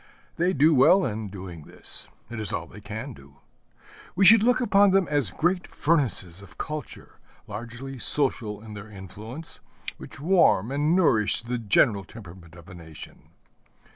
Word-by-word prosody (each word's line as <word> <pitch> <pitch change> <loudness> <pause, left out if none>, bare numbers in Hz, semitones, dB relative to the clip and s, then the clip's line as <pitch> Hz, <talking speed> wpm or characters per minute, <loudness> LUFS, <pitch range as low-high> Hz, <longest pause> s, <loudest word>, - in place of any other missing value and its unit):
They 175 +2 +1
do 155 +1 +4
well 150 +8 +5
in 110 -3 -4
doing 90 -5 -10
this: - - -4 0.2
it 120 - -6
is 105 -3 -1
all 85 - -3
they 105 +5 -14
can 110 +6 -7
do. 70 -6 -18 0.8
We 195 +2 +3
should 220 +3 +9
look 245 +3 +3
upon 205 -4 +4
them 190 -1 +2
as 145 -9 +1
great 175 - -1
furnaces 115 - -1
of 100 - -16
culture, 150 -2 -8 0.3
largely 120 +5 -8
social 115 -7 +3
in 110 -1 -10
their 105 +1 -10
influence, 105 - -9 0.4
which - - -11
warm 160 - +2
and 150 +4 +1
nourish 115 - +2
the 120 +1 -4
general 105 -1 +2
temperament 90 -6 -14
of 85 0 -15
a 95 - -12
nation. 80 -3 -13
115 Hz, 160 wpm, -25 LUFS, 100-155 Hz, 0.8 s, should